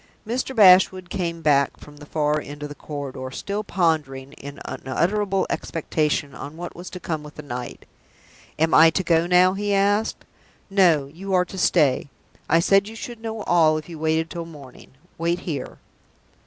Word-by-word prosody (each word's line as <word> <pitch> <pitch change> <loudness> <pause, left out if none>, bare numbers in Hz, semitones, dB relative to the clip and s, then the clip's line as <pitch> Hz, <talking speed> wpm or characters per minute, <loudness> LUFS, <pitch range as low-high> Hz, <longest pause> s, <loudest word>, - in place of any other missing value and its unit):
Mr. 250 +4 -3
Bashwood 185 -3 +6
came 170 -3 -3
back 140 -2 +3
from 145 0 -14
the 145 0 -12
far 150 0 0
end 145 +1 -9
of 150 - -5
the - - -7
corridor 140 -3 -6
still 200 +9 -4
pondering, 150 -8 -1
in 140 +1 -10
unutterable 195 +8 -1
expectation, 150 -3 -2
on 145 +4 -9
what 175 +1 -7
was 175 +1 -8
to 180 - -8
come 160 -3 -3
with 150 0 -12
the 150 - -8
night. 125 -3 -7 0.7
"Am 160 +1 +1
I 160 +1 +8
to 190 +4 -1
go 170 -1 +2
now?" 180 +1 +5
he 205 +1 -1
asked. 205 +2 +1 0.5
"No. 175 -8 +4
You 185 +7 -4
are 180 0 +3
to 185 - -11
stay. 150 -7 +2 0.4
I 165 - +5
said 195 +3 +3
you 220 - -9
should 235 0 -8
know 220 -2 -5
all 160 -4 +4
if 155 - -7
you 165 -3 -9
waited 160 +1 0
till 170 -1 -5
the - - -12
morning. 140 -6 -14 0.3
Wait 170 +2 0
here." 145 -7 -5
165 Hz, 180 wpm, -23 LUFS, 150-190 Hz, 0.7 s, I